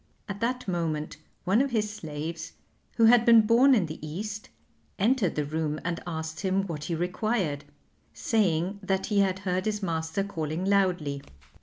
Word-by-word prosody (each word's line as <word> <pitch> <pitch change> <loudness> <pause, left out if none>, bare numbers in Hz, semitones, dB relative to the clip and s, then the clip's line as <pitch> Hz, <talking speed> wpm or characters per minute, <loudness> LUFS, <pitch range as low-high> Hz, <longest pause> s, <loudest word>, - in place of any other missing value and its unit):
At 200 0 -5
that 250 +1 -2
moment 160 -4 -2 0.3
one 195 +6 +3
of 275 - +1
his 215 -3 0
slaves, 160 -2 -6 0.4
who 230 - +6
had 235 +1 +7
been 230 -2 +7
born 240 +5 +5
in 205 -7 +2
the 155 0 -7
East, 205 +7 -5 0.5
entered 215 -2 +2
the 150 - 0
room 155 0 -2
and 170 -1 -2
asked 160 -1 -4
him 195 0 +1
what 155 -5 -5
he 170 - -2
required, 180 -4 -1 0.5
saying 195 -3 0
that 190 -1 -1
he 210 -2 +1
had 190 -2 +2
heard 185 0 0
his 210 -1 -2
master 160 +2 -1
calling 165 -2 -3
loudly. 180 -8 +1
185 Hz, 165 wpm, -27 LUFS, 160-210 Hz, 0.5 s, had